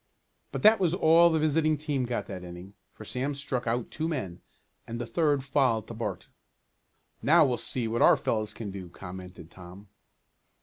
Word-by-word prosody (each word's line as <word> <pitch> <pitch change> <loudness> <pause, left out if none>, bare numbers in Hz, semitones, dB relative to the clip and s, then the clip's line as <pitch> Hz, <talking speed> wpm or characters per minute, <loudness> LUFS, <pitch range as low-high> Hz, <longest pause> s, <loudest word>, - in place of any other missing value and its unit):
But - - -5
that 215 +1 +7
was 180 -2 +1
all 170 -1 +6
the 160 - +1
visiting 155 0 +2
team 145 -4 -2
got 120 -5 -3
that 90 -1 -7
inning, 90 +2 -10 0.2
for 110 - -12
Sam 135 +6 -3
struck 130 -3 -4
out 115 +1 -1
two 160 +1 -3
men, 100 - -4 0.5
and 115 0 -5
the 120 - -3
third 145 +3 +1
fouled 130 -6 +1
to - - -6
Bart. 105 -5 -5 0.9
"Now 160 +2 +5
we'll 125 -3 0
see 120 -3 -2
what 115 +1 -1
our - - +6
fellows 110 -2 -1
can 105 -4 -6
do," 95 -2 -8
commented 90 -1 -10
Tom. 95 +3 -13
120 Hz, 180 wpm, -28 LUFS, 100-150 Hz, 0.9 s, that